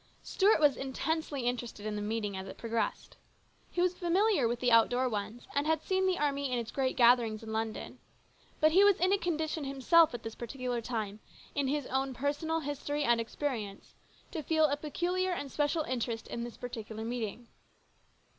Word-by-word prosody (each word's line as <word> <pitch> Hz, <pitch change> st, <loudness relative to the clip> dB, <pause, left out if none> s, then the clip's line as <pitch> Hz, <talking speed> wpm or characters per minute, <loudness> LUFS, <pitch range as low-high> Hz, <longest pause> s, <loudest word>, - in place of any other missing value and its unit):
Stuart 405 Hz, -1 st, +3 dB
was 295 Hz, -4 st, +4 dB
intensely 290 Hz, +2 st, -2 dB
interested 240 Hz, -3 st, -3 dB
in 215 Hz, -1 st, -2 dB
the 210 Hz, -, -3 dB
meeting 210 Hz, -1 st, -2 dB
as 190 Hz, 0 st, -5 dB
it -, -, -9 dB
progressed. 230 Hz, -1 st, -3 dB, 0.5 s
He 350 Hz, -, -1 dB
was 360 Hz, 0 st, +1 dB
familiar 360 Hz, -, +3 dB
with 240 Hz, +1 st, -2 dB
the 245 Hz, -1 st, +2 dB
outdoor 245 Hz, +3 st, +4 dB
ones, 220 Hz, +1 st, -4 dB
and 285 Hz, +2 st, 0 dB
had 320 Hz, -1 st, +1 dB
seen 380 Hz, 0 st, +1 dB
the 370 Hz, -1 st, +1 dB
army 280 Hz, -2 st, 0 dB
in 250 Hz, -, +1 dB
its 235 Hz, -1 st, -4 dB
great 265 Hz, -2 st, -1 dB
gatherings 235 Hz, -3 st, +4 dB
in 220 Hz, 0 st, -6 dB
London, 220 Hz, 0 st, -3 dB, 0.6 s
but 310 Hz, 0 st, +5 dB
he 380 Hz, +5 st, +6 dB
was 405 Hz, -2 st, +6 dB
in 370 Hz, +3 st, +3 dB
a 400 Hz, -, +2 dB
condition 320 Hz, -3 st, -1 dB
himself 275 Hz, +5 st, +4 dB
at 235 Hz, -, -7 dB
this 225 Hz, -, -5 dB
particular 245 Hz, 0 st, -4 dB
time, 215 Hz, -3 st, -3 dB, 0.3 s
in 285 Hz, -2 st, 0 dB
his 290 Hz, 0 st, -1 dB
own 265 Hz, 0 st, -1 dB
personal 295 Hz, +5 st, -1 dB
history 290 Hz, 0 st, -2 dB
and 235 Hz, -3 st, +3 dB
experience, 225 Hz, -5 st, -4 dB, 0.4 s
to 325 Hz, -, -3 dB
feel 315 Hz, +1 st, +3 dB
a 290 Hz, -1 st, +2 dB
peculiar 355 Hz, +5 st, -1 dB
and 285 Hz, -5 st, -5 dB
special 300 Hz, +2 st, +1 dB
interest 235 Hz, -4 st, -3 dB
in 235 Hz, -, -4 dB
this 240 Hz, -1 st, -7 dB
particular 225 Hz, -2 st, -6 dB
meeting. 235 Hz, 0 st, -4 dB
265 Hz, 185 wpm, -31 LUFS, 230-315 Hz, 0.6 s, he